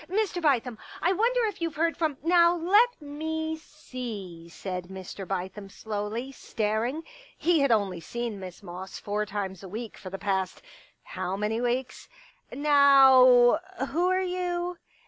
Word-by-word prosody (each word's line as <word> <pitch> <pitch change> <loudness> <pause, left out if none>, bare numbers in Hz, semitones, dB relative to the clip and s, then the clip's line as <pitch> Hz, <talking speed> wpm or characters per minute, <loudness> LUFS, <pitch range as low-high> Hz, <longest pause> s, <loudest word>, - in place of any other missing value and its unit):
" - - -18
Mr. 390 -2 0
Bithem, 250 -6 +1 0.2
I 360 +3 +2
wonder 470 +4 +2
if 415 -5 -4
you 335 - 0
Ve - - -18
heard 330 +2 +1
from.. 315 -4 -1
.'* - - -35
" - - -32
Now 340 0 +6
let 410 +8 +3
me 315 +2 -4
see," 220 - -8
said 180 0 -6
Mr. 190 0 -8
Bithem 195 +2 -4
slowly, 220 +5 -4
staring; 230 +4 -2 0.3
he 340 -2 +2
had 275 -3 +3
only 200 -5 +1
seen 235 +3 -5
Miss 185 -2 -9
Moss 180 +2 -8
four 210 +1 -2
times 195 -2 -4
a 190 - -9
week 220 +3 -6
for 185 - -8
the 195 - -5
past 190 - -2 0.2
— - - -36
how 185 +2 -2
many 215 +3 -1
weeks? 245 +1 -2 0.3
" - - -39
Now, 270 -3 +6 0.3
who 345 +5 +1
are 370 0 +2
you 355 -1 -2
250 Hz, 170 wpm, -27 LUFS, 200-325 Hz, 0.3 s, Now